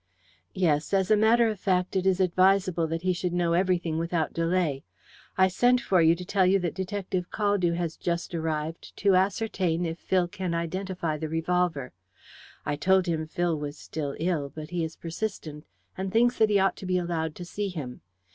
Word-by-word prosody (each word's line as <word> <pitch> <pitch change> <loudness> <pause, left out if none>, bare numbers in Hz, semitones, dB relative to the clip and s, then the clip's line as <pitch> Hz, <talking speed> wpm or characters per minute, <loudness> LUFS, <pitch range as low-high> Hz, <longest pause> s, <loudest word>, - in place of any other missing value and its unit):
"Yes. 165 -1 +1
As 190 +1 +1
a - - +7
matter 225 +2 +4
of 215 -3 -3
fact 185 -1 0
it 190 0 +1
is 190 -1 +2
advisable 185 -1 +3
that 165 +2 -3
he 185 0 +2
should 180 0 -2
know 175 -1 +1
everything 175 -3 +1
without 165 -1 -1
delay. 165 -4 0 0.5
I 190 0 +6
sent 245 +7 +3
for 185 -6 +2
you 165 +1 +5
to 180 +1 -8
tell 195 +1 +2
you 185 +2 +4
that 175 -3 -2
Detective 190 -1 -3
Caldew 205 -5 +1
has 170 -2 -3
just 170 0 -3
arrived 160 0 -4
to 200 -2 +3
ascertain 185 -3 0
if 165 0 -4
Phil 185 -2 +1
can 185 -3 -3
identify 170 -1 -2
the 155 - -4
revolver. 165 -4 0 0.7
I 145 - -1
told 190 +4 +3
him 160 -3 -2
Phil 175 +1 0
was 145 0 -5
still 145 -3 -5
ill, 160 -4 -1
but 155 +1 -8
he 175 -2 -1
is 160 0 -5
persistent, 165 -4 -5 0.3
and 190 0 -4
thinks 240 +3 +3
that 220 -1 +5
he 205 - +4
ought 195 -1 +2
to 190 - -7
be 185 0 +1
allowed 165 -3 -2
to 175 - -7
see 200 +3 -3
him. 145 -9 -7
180 Hz, 195 wpm, -27 LUFS, 165-190 Hz, 0.7 s, a